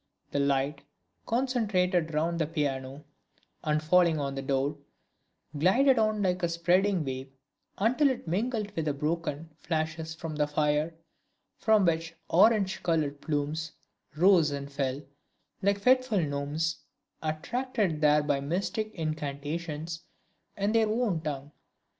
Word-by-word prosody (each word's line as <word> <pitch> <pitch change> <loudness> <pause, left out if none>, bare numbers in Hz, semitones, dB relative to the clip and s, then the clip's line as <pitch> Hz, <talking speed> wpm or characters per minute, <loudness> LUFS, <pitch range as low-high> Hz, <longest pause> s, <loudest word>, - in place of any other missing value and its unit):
The 140 - 0
light, 140 0 +1 0.5
concentrated 205 -9 +1
round 165 +2 0
the 160 - +1
piano 140 -3 -3 0.6
and 155 0 0
falling 170 -1 +4
on 140 -1 -2
the 135 - -4
floor, 140 +2 -1 0.8
glided 235 - +4
on 215 -1 +1
like 185 -1 +1
a 170 - +1
spreading 175 +1 +2
wave 130 0 -5 0.5
until 255 +8 +3
it 250 -8 -4
mingled 210 +4 -1
with 160 - -1
the 150 -2 0
broken 160 +1 -2
flashes 160 0 -3
from 165 -2 -6
the 150 -1 +2
fire, 150 +2 0 0.6
from 215 -3 +4
which 165 0 0
orange 195 +1 +4
colored 150 -4 0
plumes 155 +1 -2 0.4
rose 175 -2 +5
and 140 0 -5
fell, 140 0 -2 0.6
like 200 +1 +2
fitful 255 -1 +3
gnomes, 150 +1 -1 0.4
attracted 180 +2 -1
there 150 0 +5
by 145 -2 +1
mystic 190 +9 -2
incantations 155 +1 -4 0.6
in 200 +1 +1
their 225 -1 +3
own 215 -7 0
tongue. 145 -2 -5
160 Hz, 130 wpm, -29 LUFS, 150-195 Hz, 0.8 s, rose